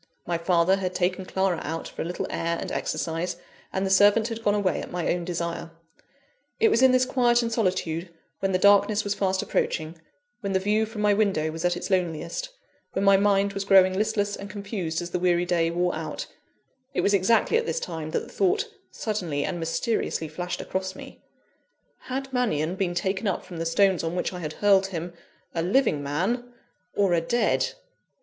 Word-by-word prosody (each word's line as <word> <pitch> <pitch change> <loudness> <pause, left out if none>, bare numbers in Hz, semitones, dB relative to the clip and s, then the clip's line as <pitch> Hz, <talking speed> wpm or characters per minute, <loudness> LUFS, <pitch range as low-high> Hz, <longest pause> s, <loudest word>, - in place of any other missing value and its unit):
My 170 -1 -1
father 175 +2 +3
had 185 -1 -3
taken 185 +1 0
Clara 190 -3 0
out 165 +2 -4
for - - -7
a - - -2
little 175 +1 -3
air 170 0 -1
and - - -5
exercise, 165 +2 -2 0.4
and 190 +1 -1
the 190 - -1
servant 205 +4 +5
had 230 0 -5
gone 205 -1 +3
away 200 -3 0
at - - -7
my 175 -1 0
own 175 0 -3
desire. 170 -1 -3 0.9
It 445 0 +5
was 245 - +3
in 260 -1 +7
this 255 0 +4
quiet 240 -2 +3
and 230 - -2
solitude, 180 -5 -1 0.3
when 195 0 0
the 185 - +3
darkness 205 +2 +4
was 205 - -1
fast 190 -2 0
approaching, 160 +1 -1 0.4
when 200 -4 -3
the 190 - +3
view 210 +3 +1
from 215 -1 -5
my 210 0 +5
window 195 -7 +1
was 165 +1 -6
at 175 0 +2
its 190 - -5
loneliest, 185 - -1 0.4
when 195 - 0
my 195 0 +7
mind 200 0 +3
was 200 0 -2
growing 190 -1 +6
listless 205 0 0
and 200 - -8
confused 195 -5 -3
as 175 - -7
the 180 - -1
weary 175 -1 +2
day 170 -2 +1
wore 175 +1 0
out - - -4 0.7
it - - +2
was 200 - +2
exactly 205 - +3
at 465 0 -1
this - - -1
time 160 - -5
that - - -1
the - - -11
thought 395 +2 +1 0.2
suddenly 175 -10 -2
and 175 - -3
mysteriously 165 0 -1
flashed 175 +3 -4
across 190 0 -3
me: - - -11 0.8
Had 265 +1 -4
Mannion 175 - 0
been 185 -2 -2
taken 190 +3 -1
up 190 - -1
from 175 - -9
the 165 0 -2
stones 190 +1 +3
on 165 +1 -2
which 180 - -1
I 180 - -5
had 155 -3 -4
hurled 195 0 +4
him, 170 -2 -5 0.4
a 165 - -1
living 185 - +2
man 195 - -1 0.4
or 195 -3 +3
a 170 - +3
dead? 235 +9 +1
190 Hz, 200 wpm, -26 LUFS, 170-205 Hz, 0.9 s, in